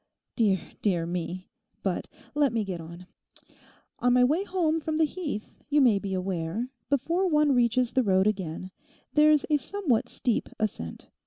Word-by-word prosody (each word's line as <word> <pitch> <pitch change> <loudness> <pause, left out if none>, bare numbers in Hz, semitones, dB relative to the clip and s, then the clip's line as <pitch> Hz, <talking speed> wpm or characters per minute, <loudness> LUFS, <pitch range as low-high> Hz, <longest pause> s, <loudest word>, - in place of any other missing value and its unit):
Dear, 205 -6 +3 0.2
dear 175 -5 +1
me? 175 +1 -4 0.3
But - - -1 0.3
let 290 -3 +3
me 225 -2 +1
get 185 -4 -5
on. 170 +2 -10 0.9
On 245 0 +3
my 250 0 +5
way 305 +9 +2
home 340 -5 0
from 310 0 -2
the 320 - +4
Heath, 300 - -3 0.2
you 295 0 +4
may 235 -7 +5
be 195 -1 -3
aware, 185 +6 -2 0.2
before 335 +7 +1
one 300 -3 +4
reaches 245 0 +2
the 260 - +4
road 190 -4 +3
again, 185 -3 -2 0.4
there's 300 -1 +5
a 300 - +5
somewhat 290 - 0
steep 240 -4 -1
ascent. 135 - -4
240 Hz, 160 wpm, -27 LUFS, 190-300 Hz, 0.9 s, my